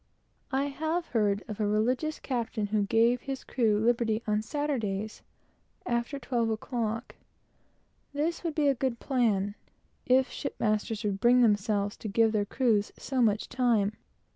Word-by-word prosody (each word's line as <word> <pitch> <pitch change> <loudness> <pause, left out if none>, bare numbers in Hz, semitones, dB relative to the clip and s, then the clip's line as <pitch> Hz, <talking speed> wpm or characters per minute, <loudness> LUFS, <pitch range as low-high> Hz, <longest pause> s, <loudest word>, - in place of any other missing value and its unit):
I 265 +1 +1
have 315 +4 -2
heard 205 -3 +1
of 215 -2 -6
a 210 - +1
religious 250 +9 0
captain 230 -4 -2
who 210 +1 0
gave 235 +3 +3
his 270 -1 -5
crew 220 -5 +1
liberty 230 -1 +1
on 210 -1 +1
Saturdays, 220 -6 -3 0.6
after 240 +4 -1
twelve 240 -3 -1
o'clock. 225 0 -3 1.0
This 305 +5 -2
would 330 -3 -2
be 300 -2 +2
a 280 - +5
good 255 -2 -2
plan, 215 -7 +1 0.5
if 260 +1 +4
shipmasters 215 -4 -2
would 200 -2 -1
bring 245 +3 +5
themselves 205 -2 +2
to - - -6
give 225 +2 +3
their 210 -2 +1
crews 215 -2 +1
so 265 -2 -1
much 215 -2 +2
time. 235 -5 +2
230 Hz, 145 wpm, -29 LUFS, 210-260 Hz, 1.0 s, a